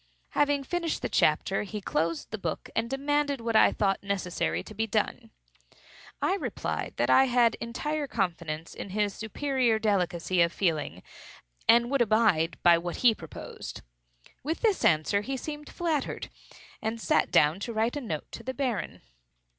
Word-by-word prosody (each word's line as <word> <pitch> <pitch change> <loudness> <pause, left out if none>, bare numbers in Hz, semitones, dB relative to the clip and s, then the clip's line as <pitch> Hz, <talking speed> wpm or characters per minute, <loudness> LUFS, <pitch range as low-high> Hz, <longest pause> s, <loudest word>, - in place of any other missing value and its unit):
Having 290 -1 +1
finished 340 +3 -2
the - - -1
chapter, - - +2
he 210 +1 -5
closed 165 -4 -2
the 220 - -4
book, - - -4
and 225 +1 0
demanded 285 +1 0
what 230 -1 -2
I - - +7
thought 195 -2 0
necessary 180 - -2
to - - -11
be 220 +2 -1
done. 225 +2 -1 0.9
I 385 - +2
replied - - -4
that - - +2
I 265 - +7
had 240 -2 +3
entire 290 +6 -2
confidence 170 - -3
in - - -7
his 205 +1 0
superior 245 +1 0
delicacy 185 -4 +1
of 170 0 +4
feeling, 155 - -1 0.6
and 235 +2 +5
would 275 -2 +2
abide 215 -7 +3
by 170 -1 +7
what 175 +1 -4
he 235 - +8
proposed. 165 -7 -9 0.6
With 315 +4 -3
this 435 -5 +2
answer 155 +6 +3
he 265 +5 -3
seemed 295 +2 -7
flattered, 320 -5 -2 0.5
and 220 +1 -2
sat - - +2
down 150 +5 +4
to 235 - -4
write 225 +3 0
a 290 - -3
note 160 - -4
to - - -7
the 260 0 -5
Baron. 245 - -3
220 Hz, 160 wpm, -28 LUFS, 180-270 Hz, 0.9 s, he